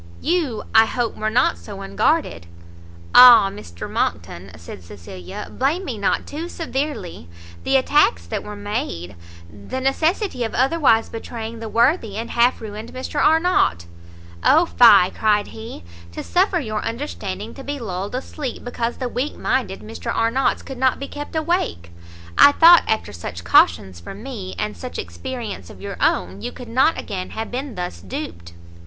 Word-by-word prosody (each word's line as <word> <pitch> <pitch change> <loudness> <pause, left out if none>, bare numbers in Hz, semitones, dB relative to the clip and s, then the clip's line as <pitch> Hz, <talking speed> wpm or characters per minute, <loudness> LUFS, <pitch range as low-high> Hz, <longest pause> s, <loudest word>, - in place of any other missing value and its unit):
You, 315 -9 -1
I 220 0 +6
hope, 240 -2 -2
were 215 - -2
not 220 - +2
so 85 - -9
unguarded 95 -3 0 0.3
" 85 0 -20
"Ah, 235 -6 +9
Mr 85 - -9
Monckton," 90 +2 -3
said 85 +2 -11
Cecilia, 90 0 -9
"blame 305 +9 0
me 240 -7 -5
not 200 - 0
too 320 +4 -6
severely! 275 - -4 0.3
the 270 - +1
attacks 260 - +2
that 85 - -4
were 210 - -8
made, 205 - -4 0.3
the 100 - -7
necessity 310 - 0
of 225 - -4
otherwise 265 -4 +3
betraying 225 0 -7
the 225 -1 -6
worthy 230 - +1
and 230 +1 -5
half 240 +1 +2
ruined 215 +1 -8
Mr. 260 +3 -2
Arnott 320 - +3 0.3
" 85 0 -19
"Oh 320 +4 +5
fie," 210 - +6
cried 210 -1 +1
he, 220 - -9 0.3
"to - - -6
suffer 365 0 +1
your 215 -7 -3
understanding 225 -5 -5
to 270 - -10
be 285 +1 -4
lulled 200 -2 -5
asleep, 260 0 -5
because 240 -1 -3
the 255 - -3
weak 250 +4 -3
minded - - -1
Mr - - -6
Arnott's 240 +4 0
could 265 -2 -8
not 260 -1 +2
be 275 - -6
kept 290 +2 -8
awake! 315 - -1 0.5
I 285 - +9
thought, 340 +2 +8
after 220 - -1
such 85 0 -7
cautions 90 +1 +3
from 195 - -10
me, 220 -9 -7
and 210 0 -3
such 255 - -7
experience 250 -5 -6
of - - -13
your 200 -1 -7
own, 90 +2 0
you - - -4
could 245 -2 -11
not 260 +7 +2
again 185 -4 -5
have 220 0 -6
been 260 0 -5
thus 180 - -5
duped." 85 -2 -7
225 Hz, 165 wpm, -21 LUFS, -, 0.5 s, Ah